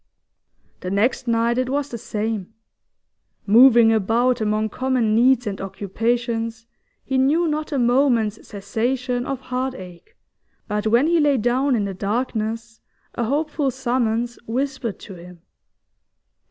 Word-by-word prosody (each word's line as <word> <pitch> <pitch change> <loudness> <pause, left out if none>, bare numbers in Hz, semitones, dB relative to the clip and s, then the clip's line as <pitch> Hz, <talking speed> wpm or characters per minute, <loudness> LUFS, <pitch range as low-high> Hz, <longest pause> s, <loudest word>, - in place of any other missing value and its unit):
The 180 - -5
next 215 +6 0
night 235 +1 +1
it 255 0 -1
was 285 +1 -1
the 235 - -5
same. 215 -1 -4 0.9
Moving 230 +1 +6
about 230 +4 +1
among 215 0 0
common 255 -3 0
needs 245 +2 +4
and 200 -2 -4
occupations, 225 +3 -2 0.4
he 265 0 0
knew 310 +6 +2
not 305 0 -3
a 285 - -1
moment's 240 -4 +1
cessation 245 +5 -2
of 275 -2 -3
heart 255 0 -3
ache, 185 - -12 0.5
but 210 +1 -2
when 235 +5 +3
he 335 +1 +3
lay 290 -3 +3
down 250 +4 +1
in 210 -3 0
the 195 - -4
darkness 225 +2 -3 0.3
a 235 - -2
hopeful 295 +2 -1
summons 240 -2 -1
whispered 260 -2 -3
to 195 - -10
him. 175 -1 -13
235 Hz, 135 wpm, -22 LUFS, 220-260 Hz, 0.9 s, Moving